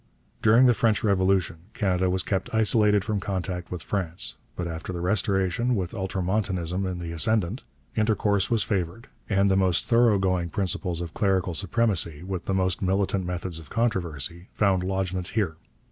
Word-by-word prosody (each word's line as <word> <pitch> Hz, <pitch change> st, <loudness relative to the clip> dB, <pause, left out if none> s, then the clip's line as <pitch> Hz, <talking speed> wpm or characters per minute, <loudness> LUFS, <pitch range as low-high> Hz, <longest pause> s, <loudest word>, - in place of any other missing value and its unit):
During 115 Hz, +4 st, +6 dB
the 125 Hz, -, +6 dB
French 110 Hz, -1 st, +1 dB
Revolution 95 Hz, -4 st, +2 dB, 0.2 s
Canada 95 Hz, -3 st, +1 dB
was 90 Hz, 0 st, 0 dB
kept 95 Hz, -2 st, -2 dB
isolated 105 Hz, -2 st, +4 dB
from 105 Hz, 0 st, -1 dB
contact 95 Hz, -3 st, -4 dB
with 90 Hz, -3 st, -5 dB
France, 90 Hz, -4 st, -2 dB, 0.2 s
but 90 Hz, -, -3 dB
after 80 Hz, +2 st, -5 dB
the 90 Hz, -, -4 dB
Restoration, 95 Hz, +5 st, +1 dB
with 90 Hz, -4 st, -3 dB
ultramontanism 95 Hz, -2 st, -1 dB
in 90 Hz, -1 st, -3 dB
the 85 Hz, -1 st, -5 dB
ascendant, 100 Hz, -, +1 dB, 0.3 s
intercourse 105 Hz, -2 st, +1 dB
was 115 Hz, -3 st, +2 dB
favoured; 95 Hz, +3 st, -3 dB, 0.2 s
and 100 Hz, -1 st, +3 dB
the -, -, +3 dB
most 95 Hz, -3 st, +2 dB
thoroughgoing 95 Hz, -7 st, +3 dB
principles 90 Hz, -1 st, -2 dB
of 85 Hz, -2 st, -6 dB
clerical 95 Hz, -3 st, +1 dB
supremacy, 90 Hz, -4 st, 0 dB
with 95 Hz, -1 st, -5 dB
the 95 Hz, -, 0 dB
most 95 Hz, -2 st, +1 dB
militant 95 Hz, -1 st, 0 dB
methods 90 Hz, -2 st, -3 dB
of 80 Hz, -4 st, -13 dB
controversy, 85 Hz, -, 0 dB
found 95 Hz, -3 st, +2 dB
lodgment 95 Hz, -1 st, -2 dB
here. 95 Hz, -8 st, -1 dB
95 Hz, 160 wpm, -26 LUFS, 90-105 Hz, 0.3 s, During